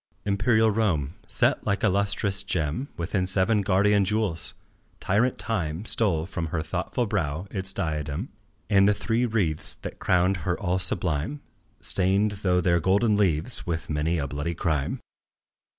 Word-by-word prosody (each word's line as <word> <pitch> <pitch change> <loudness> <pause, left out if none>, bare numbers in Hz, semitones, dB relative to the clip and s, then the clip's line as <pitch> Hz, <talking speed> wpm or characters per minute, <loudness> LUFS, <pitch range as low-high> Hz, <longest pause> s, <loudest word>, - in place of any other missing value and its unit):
Imperial 110 +2 +3
Rome, 85 -10 0
set - - +1
like 100 - 0
a - - +5
lustrous 100 0 +1
gem 80 - -1
Within 90 +2 -1
seven 100 +3 +3
guardian 100 +1 +3
jewels! 100 -4 -1 0.4
Tyrant 115 +6 +1
Time 90 -4 -2
Stole 95 -9 +1
from 85 -2 -4
her 80 -1 -2
thoughtful 90 +8 -2
brow 85 -5 -2
its 95 -1 -2
diadem 80 - -3 0.4
And 100 -2 +4
the 105 - +3
three 120 +4 0
wreaths 95 -9 0
that - - -7
crowned 95 +1 +2
her 90 -1 -2
all 90 -1 0
sublime, 90 - -1 0.4
Stained 100 +3 +3
though 90 -2 +2
their 85 0 +2
golden 100 +6 +2
leaves 95 +1 +1
with 80 -2 -3
many 75 +3 0
a 70 - -1
bloody 75 +4 -3
crime. 80 -4 -1
95 Hz, 150 wpm, -26 LUFS, 80-105 Hz, 0.4 s, a